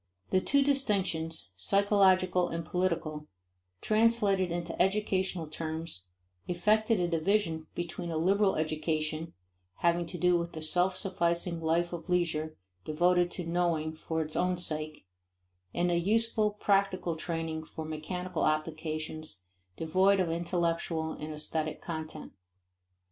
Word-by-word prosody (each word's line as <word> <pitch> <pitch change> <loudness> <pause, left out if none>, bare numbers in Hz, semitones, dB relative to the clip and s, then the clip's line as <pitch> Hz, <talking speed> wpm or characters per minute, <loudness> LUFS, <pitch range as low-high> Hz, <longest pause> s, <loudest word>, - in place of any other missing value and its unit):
The 185 - +4
two 280 +6 +3
distinctions, 185 - 0
psychological 185 - +3
and 165 -1 -4
political, 165 -4 -1 0.5
translated 215 -4 +3
into 170 -1 -2
educational 190 -3 +1
terms, 160 - -4 0.4
effected 215 +4 +2
a 175 - +1
division 165 -1 0
between 175 0 -4
a 165 - -2
liberal 195 +4 +3
education, 155 +1 -2 0.4
having 170 0 +1
to 180 - -6
do 180 0 +3
with 170 0 -4
the 160 - -6
self 180 +4 +2
sufficing 170 -2 0
life 170 +2 +1
of 175 +2 -6
leisure 160 -3 0 0.3
devoted 175 +3 +2
to 180 - -5
knowing 165 -2 0
for 160 0 -2
its 155 0 -4
own 180 0 +1
sake, 155 - -3 0.7
and 175 - +1
a 170 - +2
useful, 215 +3 +2
practical 195 -4 +1
training 160 -1 -3
for 160 0 -7
mechanical 175 +3 -4
occupations, 155 - -2 0.3
devoid 190 +5 +3
of 175 -3 +1
intellectual 170 -1 -1
and 155 0 -6
aesthetic 155 0 -2
content. 160 -2 -6
170 Hz, 125 wpm, -30 LUFS, 160-185 Hz, 0.7 s, The